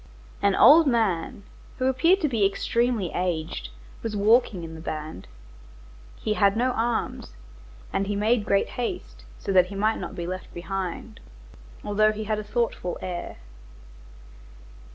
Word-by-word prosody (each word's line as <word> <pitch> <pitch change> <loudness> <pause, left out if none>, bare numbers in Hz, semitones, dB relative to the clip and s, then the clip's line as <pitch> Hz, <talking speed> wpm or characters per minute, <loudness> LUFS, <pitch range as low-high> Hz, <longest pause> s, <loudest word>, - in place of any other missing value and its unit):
An 200 -1 +3
old 315 +1 +8
man, 205 -7 0 0.3
who 255 - -1
appeared 330 +9 +3
to 310 - +2
be 230 -7 0
extremely 220 0 +1
aged, 160 - -2 0.3
was 225 -2 -4
walking 210 -3 +3
in 160 0 -7
the 160 - -9
band. 155 - -6 0.9
He 215 - -1
had 200 0 +3
no 255 +2 +2
arms, 235 -1 -2 0.6
and 195 - 0
he 205 - -1
made 215 +2 +2
great 200 -1 +1
haste, - - -5
so - - -4
that 185 -1 +5
he 200 - -8
might 215 +3 +1
not 175 - -6
be 170 - -4
left 185 +1 -6
behind, 190 +4 -5 0.6
although 215 +1 +3
he 215 0 -5
had 215 0 -1
a - - -5
thoughtful 210 -4 -2
air. 180 -1 -5
205 Hz, 150 wpm, -25 LUFS, 180-230 Hz, 0.9 s, old